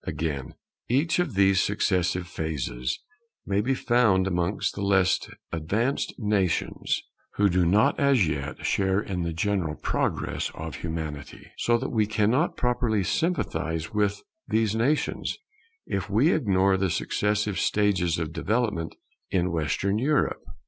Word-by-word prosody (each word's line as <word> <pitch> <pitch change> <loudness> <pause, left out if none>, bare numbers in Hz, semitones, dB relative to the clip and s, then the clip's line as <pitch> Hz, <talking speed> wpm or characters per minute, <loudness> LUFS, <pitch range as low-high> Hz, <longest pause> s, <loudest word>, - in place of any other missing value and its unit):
Again, 70 -4 -3 0.3
each 145 +8 +2
of 165 - -1
these 95 -1 +4
successive 90 -3 0
phases 75 -8 -3 0.5
may 100 0 +1
be 130 +5 0
found 115 -8 +3
amongst 90 +1 0
the 100 - -6
less 95 -2 +3 0.3
advanced 105 - -1
nations 105 -6 0 0.3
who 105 - +4
do 90 -1 +2
not 105 +5 +3
as 135 - +4
yet 75 0 -4
share 95 0 +2
in 95 -4 -3
the 85 0 -2
general 85 -2 -1
progress - - -1
of 80 0 -6
Humanity; 80 -4 -6
so 120 0 +3
that 130 +3 -3
we 110 -3 +2
cannot 110 +9 +1
properly 120 -4 +1
sympathize 85 - -1
with 105 -1 0 0.2
these 110 -1 +1
nations, 135 +7 0 0.5
if 95 +1 -3
we 120 - +4
ignore 95 -8 +2
the 95 0 +1
successive 105 +3 0
stages 95 -5 +1
of 80 -1 -3
development 105 -5 -1 0.3
in 90 -1 +1
Western 90 +6 0
Europe. 145 +4 +1
100 Hz, 135 wpm, -26 LUFS, 85-110 Hz, 0.5 s, these